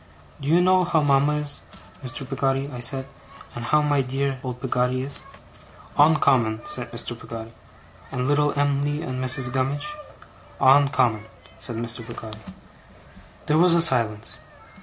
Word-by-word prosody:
'Do 140 - -4
you 170 +3 +5
know 185 0 +4
how 165 -3 +1
mama 140 +1 +3
is, 150 -1 -3 0.4
Mr. 130 +1 -4
Peggotty?' 135 +1 -1
I 125 - -6
said. 130 +2 -2 0.5
'And 120 0 -6
how 150 +4 +3
my 145 -2 +2
dear, 135 +2 -1
dear, 130 - -7
old 125 -1 -5
Peggotty 125 0 0
is?' 140 +1 -7 0.8
'Oncommon,' 130 -7 +3
said 120 -2 -4
Mr. 115 0 -2
Peggotty. 115 0 -9 0.6
'And 125 +1 -2
little 145 0 +2
Em'ly, 145 +1 0
and 130 0 -4
Mrs. 125 -1 0
Gummidge?' 135 - -1 0.7
'On 140 +1 +6
common,' 115 -5 +1 0.3
said 120 - -7
Mr. 115 +1 -5
Peggotty. 110 -1 -9 1.1
There 155 +1 +2
was 175 0 +5
a 170 - +4
silence. 110 -7 +1
135 Hz, 150 wpm, -24 LUFS, 120-145 Hz, 1.1 s, On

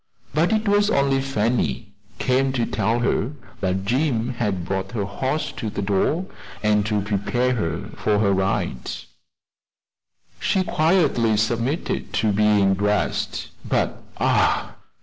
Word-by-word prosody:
But 160 +6 +2
it 220 0 +1
was 205 0 +3
only 140 -5 +2
Fanny, 115 -4 -1 0.2
come 130 +1 +1
to 120 -3 +1
tell 115 +2 0
her 120 +2 0 0.3
that 95 +1 -1
Jim 125 0 +1
had 105 -7 -2
brought 95 +3 -3
her 105 -4 -1
horse 130 +10 -2
to 110 - -4
the 100 - -4
door, 105 - +1 0.4
and 105 -1 +3
to 105 -2 +1
prepare 105 +5 0
her 85 -6 -3
for 105 -1 +1
her 100 -2 +3
ride. 95 -9 -1 1.5
She 190 - +1
quietly 155 - +2
submitted 120 +8 -1
to 110 +1 +2
being 105 -1 +4
dressed; 105 +1 -1
but, - - -1 0.2
ah! - - +2
110 Hz, 130 wpm, -23 LUFS, 100-135 Hz, 1.5 s, being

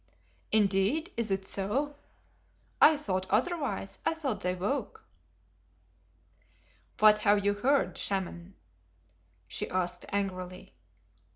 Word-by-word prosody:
"Indeed, 210 - +2
is 230 -2 -1
it 195 0 -1
so? 250 +11 -2 0.9
I 315 - +8
thought 190 -9 -3
otherwise. 265 - -1
I 325 - +1
thought 275 -9 -3
they 180 0 -1
woke." 210 +7 -3 1.9
"What 210 0 +6
have 205 -1 +3
you 205 - +3
heard, 265 +7 +1
Shaman 190 -3 -1
(i.e. 170 - -12
wizard)?" 195 - -18 0.9
she 95 - -4
asked 180 -1 -2
angrily. 185 - -4
205 Hz, 110 wpm, -30 LUFS, 190-260 Hz, 1.9 s, I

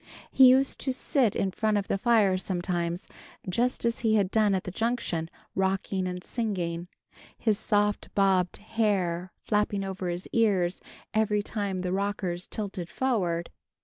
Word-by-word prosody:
He 260 -1 +8
used 265 +2 +3
to 265 - -1
sit 255 -3 +1
in 195 - 0
front 215 +2 +1
of 200 - -2
the 195 - 0
fire 215 -4 +4
sometimes, 175 -1 -2 0.4
just 235 +7 0
as 235 0 +1
he 220 -2 +2
had 200 -3 +2
done 215 -3 +3
at 185 - -1
the 185 - -5
Junction, 190 -7 -1 0.2
rocking 190 0 0
and 180 0 -5
singing, 180 -7 -3 0.5
his 215 -3 +1
soft 205 -1 0
bobbed 190 -3 +2
hair 195 -5 -1
flapping 210 -1 0
over 190 -2 -3
his 175 +1 -4
ears 195 -6 +2 0.3
every 210 -1 +2
time 200 -4 -3
the 180 0 -2
rockers 190 -3 -2
tilted 195 -5 -5
forward. 180 -10 -1
195 Hz, 150 wpm, -28 LUFS, 180-220 Hz, 0.5 s, He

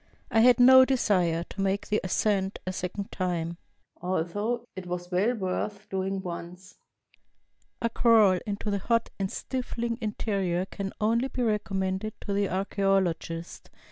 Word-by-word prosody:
I 225 - +4
had 245 +2 +6
no 260 +1 +9
desire 185 -11 +2
to 195 - -7
make 195 +1 0
the 210 - +1
ascent 195 +1 0
a 185 - -2
second 185 +2 -4
time, 170 -2 -2 0.4
although 205 +7 -1
it 185 -2 -7
was 175 0 -5
well 205 +7 +2
worth 200 +1 -3
doing 190 0 -2
once. 180 +1 -8 1.0
A 230 - +2
crawl 220 -6 +5
into 205 +1 -3
the 200 - 0
hot 230 +3 0
and 195 -1 -1
stifling 235 -2 -3
interior 195 -4 -1
can 195 0 -5
only 230 +4 +2
be 255 -2 -3
recommended 205 -1 -1
to 200 - -3
the 200 0 +1
archaeologist. 190 -3 -1
195 Hz, 140 wpm, -27 LUFS, 185-220 Hz, 1.0 s, no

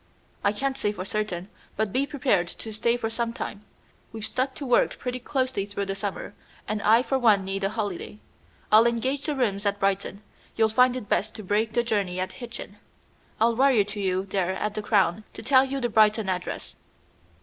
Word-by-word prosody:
"I 200 - +4
can't 270 +5 -2
say 205 - +1
for 185 -3 -6
certain, 195 -4 -3 0.3
but 215 -2 -1
be 275 +2 +1
prepared 250 - +1
to 220 +5 -8
stay 235 +3 +1
for 230 - -2
some 230 0 -2
time. 210 -2 -6 0.5
We've 220 -1 -5
stuck 260 +3 -1
to 285 - -6
work 245 -2 +3
pretty 250 0 -4
closely 255 -5 -1
through 200 0 -3
the 195 - -2
summer, 200 0 -5 0.3
and 215 -1 -2
I 225 +4 +5
for 270 0 0
one 210 -6 +4
need 195 +1 -3
a 195 - +2
holiday. 210 -2 -4 0.5
I'll 220 +2 +7
engage 260 +5 -1
the 300 - 0
rooms 210 -7 0
at 200 -1 0
Brighton. 195 +1 -1 0.3
You'll 220 -1 +3
find 250 +3 +4
it 245 -5 -5
best 215 +2 0
to 215 - -7
break 215 +3 0
the 240 - +2
journey 200 -6 -1
at 185 - -2
Hitchin. 235 -4 -9 0.6
I'll 230 +1 +3
wire 260 -4 +4
to 205 +1 -7
you 190 -1 0
there 190 -2 -1
at 210 +2 -2
the 215 - -3
Crown 205 -1 +2
to - - -9
tell 260 +2 +5
you 270 +1 -3
the 245 - 0
Brighton 215 -2 +3
address." 180 -1 -4
215 Hz, 205 wpm, -26 LUFS, 200-245 Hz, 0.6 s, I'll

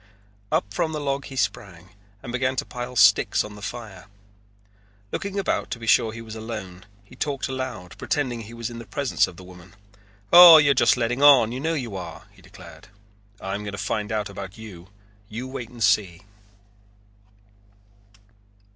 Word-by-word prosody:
Up 100 0 -1
from 160 +9 -1
the 155 - -3
log 140 -1 -2
he 135 - -10
sprang 100 -6 -3 0.3
and 120 - -7
began 130 +1 -1
to - - -2
pile 125 +1 -7
sticks - - +4
on 105 -1 -10
the 105 - -12
fire. 105 -5 -8 1.0
Looking 200 0 -4
about 195 - -1
to - - -4
be 115 - -9
sure 110 0 +3
he 115 +1 -9
was 110 -1 -9
alone 105 -4 -8 0.2
he 110 +5 -17
talked 140 +1 -3
aloud 130 -10 -6
pretending 125 -6 -2
he 115 +1 -11
was 115 0 -5
in 120 - -8
the 115 - -11
presence 135 +6 0
of 90 - -12
the 95 - -12
woman, 90 0 -15 0.6
"Oh, 175 -2 +11
you're 145 -2 +5
just 135 0 +3
letting 120 +2 -1
on, 135 -6 +7
you 125 - -5
know 165 +4 -1
you 120 -9 -5
are," 95 - -8
he - - -21
declared. - - -15 0.5
"I 95 - -5
am 100 - -3
going 105 -1 -6
to - - -6
find 105 +2 -3
out 105 -2 -1
about 100 0 -9
you. 100 -5 -12 0.4
You 120 +4 -6
wait 130 -3 -7
and 120 -2 -5
see." 95 -3 +1
115 Hz, 180 wpm, -24 LUFS, 100-130 Hz, 1.0 s, Oh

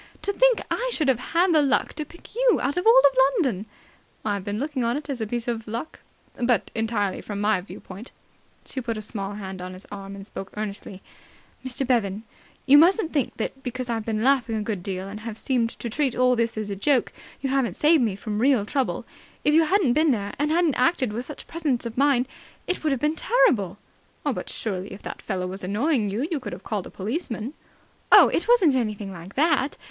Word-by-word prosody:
To 405 - 0
think - - +4
I - - 0
should 305 - +1
have 250 -3 +2
had 340 +7 +2
the 310 - +5
luck 280 -1 +1
to 305 0 -4
pick 345 +7 -16
you - - +3
out 280 +3 -1
of 360 +4 0
all - - +8 0.4
London!" 225 - 0 0.6
"I've 200 -3 -1
been 205 +1 -3
looking 275 0 -2
on 235 +3 +1
it 290 -1 -5
as 250 -4 -4
a 220 - -1
piece 240 +2 -3
of 230 -2 -3
luck 235 +8 -5 0.4
but 240 -3 +1
entirely 220 -4 -1
from 205 -1 -5
my 205 -2 +2
viewpoint." 195 +3 -10 0.6
She 260 - -4
put 230 -2 -3
a - - -4
small 200 -2 -4
hand 190 -2 -7
on 185 0 -6
his 185 +2 -10
arm, 195 -1 -7
and 195 0 -9
spoke 195 -2 -8
earnestly. 200 -2 -5 0.6
"Mr. 260 +1 -1
Bevan, 220 -5 0 0.4
you 285 +2 +8
mustn't 350 +1 +4
think 280 -6 -1
that, 270 +4 -4
because 250 -1 -4
I've 225 -1 -2
been 215 0 -2
laughing 255 -4 +2
a 215 - -1
good 205 -4 -3
deal 190 +1 -4
and 205 +2 -7
have 220 0 -6
seemed 245 -3 0
to - - -5
treat 265 +2 0
all 250 0 +4
this 230 -1 0
as 210 -1 -3
a - - -2
joke, 260 +5 +1 0.3
you 270 - -2
haven't 270 -3 +1
saved 310 0 +4
me 215 -5 0
from 210 +1 -4
real 250 -4 +3
trouble. 265 +3 -1 0.4
If 295 - +3
you 325 +1 +5
hadn't 360 -7 +3
been 310 +3 +3
there 205 -6 -1
and 295 +1 +1
hadn't 330 -1 +3
acted 255 -4 +1
with 240 +3 -3
such 295 - -8
presence 295 -8 -1
of 230 -1 -5
mind, 265 -2 +3 0.4
it 365 - -2
would 310 - +1
have 270 - 0
been 300 +1 +1
terrible!" 310 - +2 0.5
"But - - -2
surely, 190 -3 -3
if 195 - -11
that - - -7
fellow 185 -3 -3
was 190 +2 -6
annoying 215 - +1
you, 230 +9 -2
you 315 - 0
could 210 -7 -6
have 180 - -9
called 205 -4 -3
a - - -10
policeman?" 230 - -4 0.6
"Oh, - - +9
it - - 0
wasn't 405 - +5
anything 215 -5 -2
like 175 +2 -11
that. 295 -2 +2
240 Hz, 220 wpm, -25 LUFS, 205-290 Hz, 0.6 s, Oh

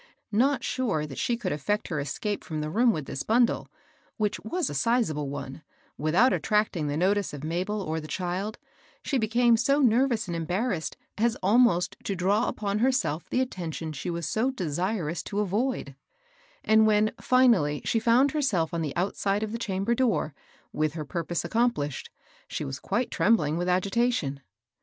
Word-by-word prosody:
Not 260 +4 +2
sure 210 -13 -1
that 135 -3 -7
she 240 - 0
could 210 -6 -3
effect 205 +9 -1
her 155 - -1
escape 190 +10 -3
&om 155 -2 -2
the 150 0 -3
room 235 +5 +4
with 155 -9 -3
this 135 - -5
bundle, 235 +2 +2 0.3
— - - -36
which 210 -2 0
was 340 +6 -2
a - - -4
sizable 215 - +1
one, 140 +1 -6 0.2
— - - -33
without 170 - +4
attracting 210 -7 +1
the 145 +1 -1
notice 195 0 +1
of 145 - -9
Mabel 185 +6 -2
or 160 -1 -2
the 155 - -8
child, 185 +5 -3 0.5
she 275 - 0
became 235 +1 +3
so 275 +5 +2
nervous 245 -2 +3
and 175 - -3
embarrassed 175 +2 -2 0.2
as 235 +1 +2
almost 205 -3 +3
to 195 - -1
draw 195 +5 +1
upon 205 -1 -2
herself 250 - 0
the 255 - +1
attention 165 -9 -4
she 150 +5 -5
was 170 -1 -3
so 220 +11 +1
desirous 180 - -2
to 205 - -4
avoid; 210 - -1 0.7
and 220 0 +5
when, 215 0 +3
finally, 230 - +3
she 225 - +2
found 240 +5 +4
herself 220 - 0
on 170 - -1
the 150 -4 -3
outside 195 +3 0
of 215 - -3
the 230 - -4
chamber 200 0 -1
door, 230 - +1 0.4
with 155 -1 0
her 155 -2 -5
purpose 170 +2 -3
accomplished, 170 - 0 0.4
she 150 - -4
was 135 0 -5
quite 240 - -1
trem 195 +7 +4
bling 150 -7 -1
with 175 +2 -1
agitation. 190 - +1
200 Hz, 180 wpm, -27 LUFS, 160-235 Hz, 0.7 s, and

